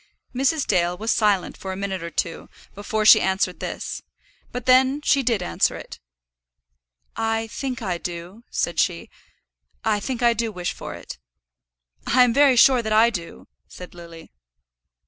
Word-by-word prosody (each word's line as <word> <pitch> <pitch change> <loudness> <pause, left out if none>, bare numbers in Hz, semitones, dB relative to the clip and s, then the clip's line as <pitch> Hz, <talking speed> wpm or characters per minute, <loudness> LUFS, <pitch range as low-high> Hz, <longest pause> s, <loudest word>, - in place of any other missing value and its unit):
Mrs. 275 +4 +1
Dale 175 -2 +1
was 220 +4 -1
silent 205 -4 +1
for 190 - -7
a - - -4
minute 190 -1 -4
or 170 - -5
two 165 +1 -4 0.2
before 215 +2 -3
she 215 - +8
answered 190 -1 -1
this, - - -5 0.5
but 250 -1 -6
then 260 +2 +4
she 280 - +3
did 230 -6 0
answer 85 - 0
it. - - -10 1.2
"I 225 0 -1
think 250 +2 -5
I 180 -4 -2
do," 175 +6 -8
said 170 - -2
she. 170 -2 -1 0.7
"I 215 -2 +2
think 245 +3 -4
I 235 0 +5
do 230 -1 -2
wish 180 -3 -4
for - - -8
it." - - -10 0.9
"I 250 +1 +5
am 245 -2 +2
very 280 0 +5
sure 250 +1 +6
that 220 -1 -4
I 225 +2 +5
do," 170 -6 -8 0.2
said 180 - -11
Lily. 170 -2 -13
215 Hz, 165 wpm, -23 LUFS, 180-240 Hz, 1.2 s, she